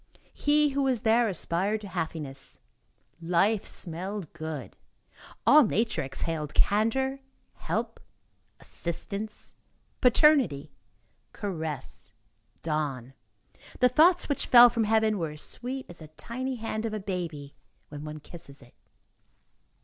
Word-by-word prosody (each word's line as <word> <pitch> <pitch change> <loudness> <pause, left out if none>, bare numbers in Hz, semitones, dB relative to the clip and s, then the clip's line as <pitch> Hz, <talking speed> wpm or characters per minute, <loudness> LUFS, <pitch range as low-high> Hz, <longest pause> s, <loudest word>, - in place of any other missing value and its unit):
He 295 0 +3
who 280 0 -1
was 260 -5 +1
there 230 0 +3
aspired 195 +4 0
to 205 - -8
happiness; 160 -6 -5 0.6
life 190 +5 +1
smelled 185 +1 -5
good; 160 -4 -6 0.7
all 305 +1 +8
nature 220 -5 0
exhaled 150 +2 -4
candor, 265 +6 +2 0.3
help, - - -3 0.6
assistance, 200 +5 -6 0.5
paternity, 250 - +4 0.6
caress, 160 - -5 0.5
dawn. 140 -5 -2 0.7
The 250 - +5
thoughts 335 +8 +4
which 285 - -2
fell 240 -1 +9
from 230 -2 0
heaven 220 -1 +2
were 165 -2 -2
as 150 - -4
sweet 260 +2 -4
as 175 - -13
the 155 - -10
tiny 255 - -5
hand 225 -1 -3
of 215 - -4
a - - -3
baby 170 -7 -5 0.4
when 145 0 -8
one 155 0 -7
kisses 150 -3 -12
it. 120 - -20
200 Hz, 120 wpm, -28 LUFS, 155-240 Hz, 0.7 s, fell